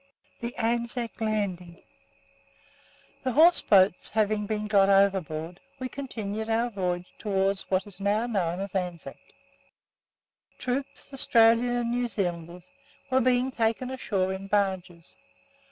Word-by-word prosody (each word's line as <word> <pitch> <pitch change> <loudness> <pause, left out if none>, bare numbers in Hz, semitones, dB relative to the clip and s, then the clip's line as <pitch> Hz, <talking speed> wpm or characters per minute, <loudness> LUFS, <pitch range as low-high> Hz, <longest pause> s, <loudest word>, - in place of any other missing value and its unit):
THE 235 0 -5
ANZAC 235 0 -1
LANDING 190 -6 -3 1.4
The 255 - -2
horse 335 +6 +6
boats 190 -2 +3
having 215 -1 0
been 215 0 -2
got 200 -2 +4
overboard, 185 -4 +1 0.2
we 255 -1 -5
continued 220 -6 -5
our 230 +2 +1
voyage 180 -3 -3
towards 195 -2 -1
what 185 0 +1
is 200 -2 -14
now 205 +3 +1
know 185 -7 -1
as 195 -1 -5
Anzac. 180 -3 -4 1.4
Troops 270 +2 -4
Australians 235 -1 +4
and 235 0 -2
New 245 0 0
Zealanders 175 -4 -4 0.4
were 260 0 +4
being 255 +1 +2
taken 230 +1 -1
ashore 195 -7 -1
in 190 +1 -7
barges. 190 -4 -2
210 Hz, 120 wpm, -27 LUFS, 190-235 Hz, 1.4 s, horse